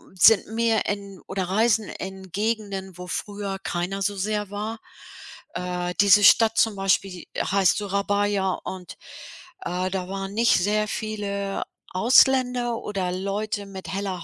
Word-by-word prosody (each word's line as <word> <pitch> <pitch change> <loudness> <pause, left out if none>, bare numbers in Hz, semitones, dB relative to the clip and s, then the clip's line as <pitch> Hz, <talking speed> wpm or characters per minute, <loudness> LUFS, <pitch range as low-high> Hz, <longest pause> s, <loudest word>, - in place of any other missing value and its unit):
sind 200 +3 +6
mehr 225 0 +1
in 200 -2 -4
oder 190 0 -2
reisen 220 +3 +2
in 190 -1 -8
Gegenden, 200 -3 -3
wo 180 0 -8
früher 200 +1 -4
keiner 180 +3 -2
so 205 +1 0
sehr 210 +1 -2
war. 215 +3 -5 0.7
Äh, 180 0 -3
diese 205 0 +6
Stadt 225 +2 +6
zum 225 -4 +3
Beispiel 195 -2 0
heißt 195 -2 +2
Surabaya 200 -1 0
und, 185 -2 -7 0.7
äh, 180 +1 -1
da 185 -1 -3
waren 195 0 -5
nicht 230 +2 +4
sehr 210 +3 +1
viele 200 -2 -3 0.3
Ausländer 245 +3 +3
oder 190 -3 -3
Leute 200 +3 -3
mit 190 -1 -9
heller 190 -3 -3
200 Hz, 135 wpm, -24 LUFS, 190-215 Hz, 0.7 s, sind